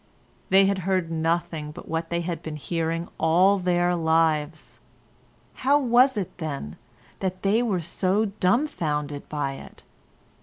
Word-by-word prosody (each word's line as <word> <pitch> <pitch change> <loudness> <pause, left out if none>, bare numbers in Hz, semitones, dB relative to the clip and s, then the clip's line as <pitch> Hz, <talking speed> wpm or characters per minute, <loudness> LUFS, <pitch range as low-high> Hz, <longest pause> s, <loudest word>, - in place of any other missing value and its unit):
They 195 +1 +6
had 195 0 +1
heard 185 -2 -1
nothing 165 -1 -1
but 160 - -11
what 165 0 -3
they 170 0 -1
had 170 -2 -4
been 155 -2 -6
hearing 165 +2 -2
all 185 +5 +4
their 175 -1 +1
lives; 160 -2 0 0.8
how 275 +3 +4
was 255 -1 +4
it, 190 -3 -4
then, 140 - -5 0.4
that 185 -1 -3
they 205 +4 +3
were 205 -7 0
so 185 +5 0
dumbfoundered 180 - -1
by 145 -2 -2
it? - - -13
170 Hz, 140 wpm, -25 LUFS, 160-195 Hz, 0.8 s, They